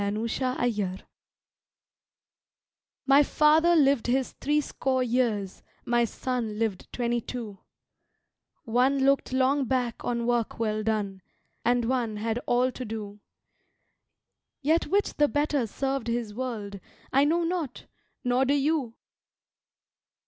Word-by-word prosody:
Killed 200 +1 -1 0.2
in 265 - -2
Action 205 -6 -1 2.0
MY 275 +1 +6
father 310 +4 +4
lived 280 -6 +3
his 260 +1 +1
three 295 +1 0
score 260 -3 -1
years; 230 -6 -1 0.2
my 240 0 +2
son 230 -2 -3
lived 215 -4 -2
twenty 240 -1 -1
two; 220 -5 -7 1.0
One 265 +2 +2
looked 275 -1 +2
long 265 +2 +2
back 245 -2 -1
on 235 -1 -1
work 240 -2 0
well 215 -1 -1
done, 210 -3 -2 0.4
and 240 0 +2
one 235 -3 -1
had 225 +2 -1
all 250 +1 +2
to 255 - -7
do 210 -3 -6 1.4
Yet 320 +4 +2
which 405 +2 +1
the 295 - +4
better 290 -4 0
served 270 +2 -2
his 230 -2 -2
world, 215 -5 -5 0.3
I 275 +2 +5
know 335 +4 +2
not, 330 -6 -3 0.4
nor 250 +1 +2
do 280 +2 +2
you! 285 -5 0
245 Hz, 125 wpm, -27 LUFS, 225-275 Hz, 2.0 s, MY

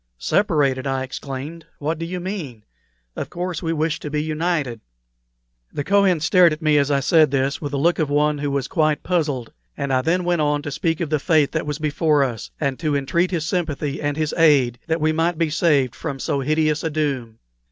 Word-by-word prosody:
"Separated!" 140 - +1
I 135 -1 -1
exclaimed. 140 +5 -7
"What 155 +2 -2
do 165 - -4
you 180 +1 -4
mean? 170 - -6 0.5
Of - - -5
course 180 0 -4
we 165 -2 -1
wish 160 0 -1
to 150 - -6
be 150 +1 -1
united." 155 -7 -2 0.9
The 145 - -3
Kohen 195 -3 +3
stared 175 +1 +5
at 155 +2 -4
me 150 -1 +4
as 140 0 +1
I 140 -1 +2
said 155 +2 +4
this 135 +1 -1
with 145 -2 -4
the 140 - -2
look 170 +5 +2
of 155 -3 0
one 150 0 +1
who 145 0 -1
was 140 -1 -1
quite 155 -3 +1
puzzled; 150 -9 -1 0.2
and 140 -2 -2
I 130 - +3
then 175 +6 +1
went 175 -2 +1
on 145 -1 +1
to 145 - -5
speak 165 +3 -1
of 160 -3 -3
the 155 - +2
fate 155 -2 +2
that 155 -1 -2
was 150 -1 -2
before 150 -1 +2
us, 120 -5 -4
and 140 -4 -1
to 155 -3 0
entreat 170 +6 +1
his 165 -4 -2
sympathy 155 -4 -2
and 145 0 -1
his 155 -1 -1
aid 135 -7 +4
that 160 0 0
we 155 +1 +3
might 165 +1 0
be 165 -2 0
saved 145 -6 +2
from 140 0 -5
so 140 +1 -1
hideous 155 +2 +1
a 160 - 0
doom. 135 -7 -2
150 Hz, 215 wpm, -21 LUFS, 140-165 Hz, 0.9 s, stared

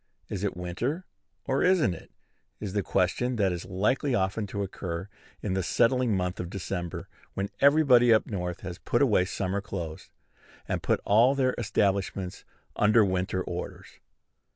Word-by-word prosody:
"Is 100 -1 -4
it 100 -3 -2
winter, 120 - -3 0.4
or 135 0 0
isn't 180 - +3
it?" 80 - -11 0.5
is 100 -3 -5
the 105 - +1
question 100 +8 0
that 100 -4 +2
is 90 -1 -4
likely 120 +8 0
often 100 +2 0
to 100 +1 -3
occur 90 -1 -5 0.4
in 100 - -1
the 95 - 0
settling 115 +3 +2
month 90 -1 -2
of 90 - -4
December, 90 -3 -4 0.3
when 100 +1 -2
everybody 140 -5 +6
up 110 - +5
North 90 -3 -4
has 90 -1 -7
put 120 - +1
away 105 -8 +3
summer 95 +1 -2
clothes, 85 -6 -6 0.6
and - - -2
put - - +1
all 120 +7 +5
their 130 -2 +2
establishments 100 -3 -1 0.3
under 105 +1 +5
winter 95 0 -1
orders. 90 0 -7
100 Hz, 155 wpm, -28 LUFS, 90-120 Hz, 0.6 s, everybody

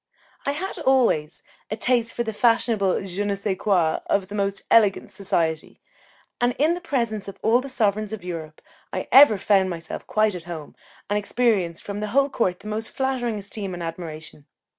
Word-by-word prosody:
I 280 - +2
had 375 +5 -5
always 255 - +2 0.3
a 215 - -3
taste 235 -1 +1
for 235 - -1
the 220 -1 -4
fashionable 220 -4 +2
je 195 +2 -3
ne 205 -1 0
sais 200 0 -2
quoi 180 -5 +1
of 195 -2 0
the - - -8
most 200 -1 -1
elegant 210 -4 +4
society, 165 -5 -2 0.6
and 245 0 +2
in 310 +4 +3
the 355 - -5
presence 230 - -2
of 200 - -8
all 235 +3 +4
the 275 - -7
sovereigns 215 -4 0
of 220 -4 -6
Europe 160 -3 -7 0.3
I - - -4
ever 265 -6 +8
found 195 -1 +3
myself 170 -2 -6
quite 215 -1 +2
at 175 -2 -7
home, 165 -4 -8 0.3
and 205 +1 +1
experienced 205 -6 0
from 200 0 -5
the 210 - -2
whole 275 0 +4
court 185 -9 0
the 210 - -10
most 215 +1 -3
flattering 255 -4 -1
esteem 200 -2 -6
and 175 - -6
admiration. 160 -3 -7
205 Hz, 185 wpm, -24 LUFS, 180-235 Hz, 0.6 s, ever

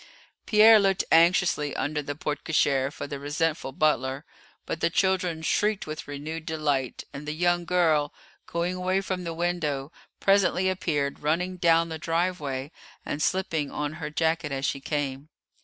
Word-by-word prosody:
Pierre 215 0 +7
looked 195 -2 +2
anxiously 165 -3 +4
under 150 +3 -1
the 145 0 -5
porte 145 -1 -4
cochère 140 -3 +2
for - - -6
the 140 -1 -6
resentful 150 0 -1
butler; 135 -1 0 0.4
but 165 - -4
the - - +2
children 180 -2 0
shrieked 210 +5 +1
with 155 0 -7
renewed 155 +3 -6
delight, 145 -5 -1
and 145 +2 -8
the 150 - -2
young 175 +1 +1
girl, 160 -4 +2 0.4
going 170 +2 -1
away 185 +1 0
from 185 -2 -4
the 165 - -3
window, 160 -5 -2 0.3
presently 195 -1 +3
appeared, 150 -6 -1
running 170 +5 0
down 165 -1 +3
the 160 -1 -5
drive 175 +3 0
way, 135 0 -4 0.3
and 145 - -3
slipping 165 -5 0
on 150 0 -3
her 150 - -3
jacket 160 0 0
as 135 0 -2
she 140 - -1
came. 140 0 -3
160 Hz, 160 wpm, -26 LUFS, 145-180 Hz, 0.4 s, Pierre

